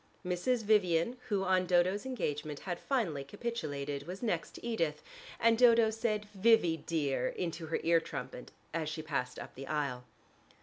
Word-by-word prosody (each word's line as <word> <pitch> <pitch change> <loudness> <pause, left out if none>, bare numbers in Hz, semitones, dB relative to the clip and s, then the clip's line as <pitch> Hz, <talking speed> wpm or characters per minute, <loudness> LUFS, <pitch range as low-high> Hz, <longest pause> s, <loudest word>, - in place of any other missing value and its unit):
Mrs. 220 +7 0
Vivian, 205 +1 +3
who 200 -3 +1
on 185 -1 +2
Dodo's 185 +6 +2
engagement 150 - -3
had 175 -2 -4
finally 190 - -1
capitulated, 145 - -4
was 185 +6 -6
next 180 -8 -1
to - - -9
Edith, 195 -10 -1 0.4
and 230 -1 +4
Dodo 230 -2 +6
said 215 -1 -1
"Vivy, 195 -5 +4
dear!" 145 -5 -1
into 170 -2 -4
her 160 - -1
ear 165 0 +5
trumpet, 135 -5 -7 0.2
as 160 -2 -1
she 155 0 -5
passed 125 -5 -2
up - - -8
the 135 +1 -8
aisle. 140 -5 -2
175 Hz, 160 wpm, -33 LUFS, 150-220 Hz, 0.4 s, Dodo